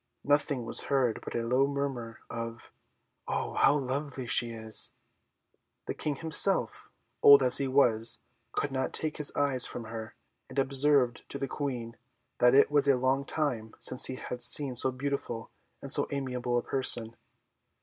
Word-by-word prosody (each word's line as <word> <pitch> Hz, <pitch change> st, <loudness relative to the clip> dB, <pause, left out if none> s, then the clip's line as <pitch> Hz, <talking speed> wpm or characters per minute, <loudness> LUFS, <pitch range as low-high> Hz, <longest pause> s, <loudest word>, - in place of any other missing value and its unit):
Nothing 145 Hz, -3 st, 0 dB
was -, -, -2 dB
heard 130 Hz, -5 st, 0 dB
but -, -, -8 dB
a 120 Hz, -, -2 dB
low 125 Hz, +4 st, +1 dB
murmur 135 Hz, -5 st, -5 dB
of 115 Hz, 0 st, -8 dB, 0.6 s
"Oh! -, -, -3 dB
how -, -, +3 dB
lovely 135 Hz, 0 st, -4 dB
she 120 Hz, 0 st, +3 dB
is!" 110 Hz, -1 st, +1 dB, 0.9 s
The -, -, -4 dB
King 150 Hz, -2 st, -3 dB
himself, 160 Hz, -, +2 dB, 0.3 s
old 140 Hz, -1 st, +7 dB
as 125 Hz, 0 st, +4 dB
he 140 Hz, -, -1 dB
was, 120 Hz, -4 st, +2 dB, 0.4 s
could 145 Hz, -, -2 dB
not 130 Hz, 0 st, -3 dB
take 155 Hz, -1 st, -1 dB
his 150 Hz, -, +2 dB
eyes 140 Hz, -3 st, +3 dB
from 120 Hz, -, -7 dB
her, 110 Hz, +1 st, -9 dB, 0.3 s
and 130 Hz, -, -12 dB
observed 135 Hz, -2 st, +1 dB
to -, -, -5 dB
the 135 Hz, -, -4 dB
Queen, 125 Hz, -5 st, -5 dB, 0.4 s
that 125 Hz, +1 st, +4 dB
it 140 Hz, -, +4 dB
was 145 Hz, -1 st, +2 dB
a 135 Hz, -2 st, +4 dB
long 130 Hz, +2 st, 0 dB
time 125 Hz, -9 st, -3 dB
since 130 Hz, -, +3 dB
he 130 Hz, -, -5 dB
had 125 Hz, -1 st, -7 dB
seen 125 Hz, +2 st, +4 dB
so 130 Hz, +2 st, +2 dB
beautiful 130 Hz, -4 st, -5 dB, 0.3 s
and -, -, -4 dB
so -, -, +1 dB
amiable 125 Hz, -3 st, -3 dB
a 120 Hz, -, -2 dB
person. 120 Hz, -4 st, +2 dB
130 Hz, 165 wpm, -28 LUFS, 120-140 Hz, 0.9 s, old